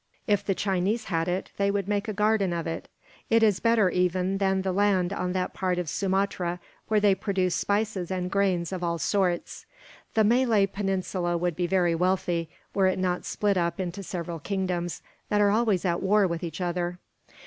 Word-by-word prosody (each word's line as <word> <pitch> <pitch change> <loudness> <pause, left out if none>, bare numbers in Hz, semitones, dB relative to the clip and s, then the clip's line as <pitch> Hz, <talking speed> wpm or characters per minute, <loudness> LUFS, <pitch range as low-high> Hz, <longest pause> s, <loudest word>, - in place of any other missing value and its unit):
If 205 -2 +2
the 195 -1 0
Chinese 195 +4 0
had 165 +1 +1
it, 180 +2 -2
they 200 0 +2
would 200 -1 -1
make 205 +1 -1
a - - -1
garden 210 -3 +2
of 170 -1 -3
it. 165 - -4 0.4
It 225 0 +4
is 210 -4 +4
better, 230 -4 +3
even, 180 +1 0
than 190 -1 +1
the 190 - 0
land 190 -1 +2
on 180 -2 -2
that 185 -1 -2
part 185 -1 -1
of 180 -2 -2
Sumatra 185 -1 -1 0.3
where 215 -1 +3
they 205 -1 +4
produce 190 -2 0
spices 205 -3 -1
and 180 -1 -2
grains 190 -4 +1
of 180 -1 -4
all 170 -1 0
sorts. 180 0 -1 0.5
The 220 - +5
Malay 230 -2 +4
Peninsula 190 -3 -2
would 175 -1 -1
be 175 +1 -1
very 175 -2 +2
wealthy, 175 -1 0 0.2
were 195 -1 +3
it 185 - +1
not 180 -1 -1
split 205 -2 0
up 170 +1 0
into 185 +1 -3
several 170 -3 -5
kingdoms, 180 -1 -2 0.3
that 210 - +2
are 205 -1 +4
always 215 -4 +2
at 170 -1 0
war 205 +1 +4
with 170 -2 -2
each 165 +1 -5
other. 175 0 -2
190 Hz, 190 wpm, -27 LUFS, 175-200 Hz, 0.5 s, The